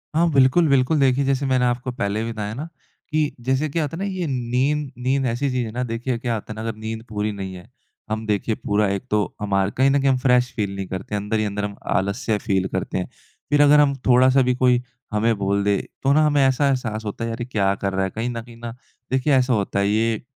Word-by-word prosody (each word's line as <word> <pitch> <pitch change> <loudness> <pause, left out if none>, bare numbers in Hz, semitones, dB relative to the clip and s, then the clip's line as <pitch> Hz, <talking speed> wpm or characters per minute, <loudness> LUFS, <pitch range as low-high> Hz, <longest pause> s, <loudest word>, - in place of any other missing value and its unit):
हाँ 170 +1 +3
बिल्कुल, 140 +5 +4
बिल्कुल। 140 +2 +3
देखिए 135 0 +3
जैसे 135 0 0
मैंने 130 -2 +2
आपको 125 +1 -1
पहले 105 -1 -2
भी 115 - -3
बताया 105 -1 -4
ना 145 +8 -5 0.4
कि 155 -1 +1
जैसे 130 +5 0
क्या 160 +3 -1
होता 150 +3 -4
है 195 - -3
ना - - -1
ये 185 -2 -3
नींद, 135 +3 0
नींद 130 +2 0
ऐसी 130 +3 0
चीज़ 125 -1 -1
है 110 - -6
ना। 125 +3 -2
देखिए 120 +1 -2
क्या 120 0 -2
होता 110 -1 -5
है 110 - -6
ना 110 - -6
अगर 110 - -5
नींद 110 +1 -5
पूरी 105 0 -2
नहीं 95 -2 -6
है। 90 - -12 0.4
हम 110 +1 -3
देखिए 105 +1 0
पूरा 105 0 0
एक 100 - -4
तो 105 -1 +3 0.2
हमार 95 -1 +1
कहीं 135 +2 +4
न 140 +1 +3
कहीं 135 - +2
हम 130 - +3
फ़्रेश 125 -1 +2
फ़ील 100 -2 -2
नहीं 95 -1 -4
करते 95 +2 -5
हैं, 100 - -1
अंदर 105 +2 -1
ही 110 - 0
अंदर 105 0 -3
हम 100 -1 -6 0.2
आलस्य 105 +3 0
फ़ील 95 -2 0
करते 95 0 -2
हैं। 90 - -2 0.4
फ़िर 145 0 +4
अगर 145 +1 +7
हम 140 -2 +4
थोड़ा-सा 130 +2 +5
भी 125 0 +2
कोई 125 -1 +3 0.3
हमें 110 +2 +2
बोल 100 0 0
दे 100 0 +2 0.3
तो 135 - +3
ना 155 +1 +4
हमें 145 -2 +3
ऐसा 135 +2 +2
एहसास 115 -5 -1
होता 105 +3 -4
है 115 - -2
यार 115 - -4
ये - - -2
क्या 100 -5 +1
कर 100 -1 -3
रहा 95 - 0
है? 95 - -1
कहीं 115 +5 -3
न 115 -1 -4
कहीं 120 0 -14
ना 120 0 -6 0.4
देखिए 130 +2 +2
ऐसा 130 -1 +3
होता 100 -2 0
है। 100 - +2
ये 110 +1 +1
120 Hz, 260 wpm, -22 LUFS, 105-135 Hz, 0.4 s, अगर